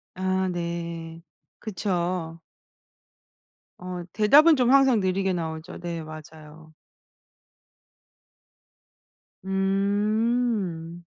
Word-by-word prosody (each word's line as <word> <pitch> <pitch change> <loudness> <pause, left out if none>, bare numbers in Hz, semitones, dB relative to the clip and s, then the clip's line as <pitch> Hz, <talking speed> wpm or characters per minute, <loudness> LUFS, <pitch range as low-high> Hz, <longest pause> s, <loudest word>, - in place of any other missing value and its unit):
아 185 0 0
네. 170 -1 -5 0.4
그쵸. 175 -4 -3 1.4
어 180 0 -6
대답은 295 +9 +6
좀 250 -1 +2
항상 270 -4 +5
느리게 190 0 0
나오죠. 160 -2 -5
네. 170 -1 -5
맞아요. 155 0 -12 2.7
음. 195 -2 0
185 Hz, 120 characters per minute, -25 LUFS, 165-205 Hz, 2.7 s, 대답은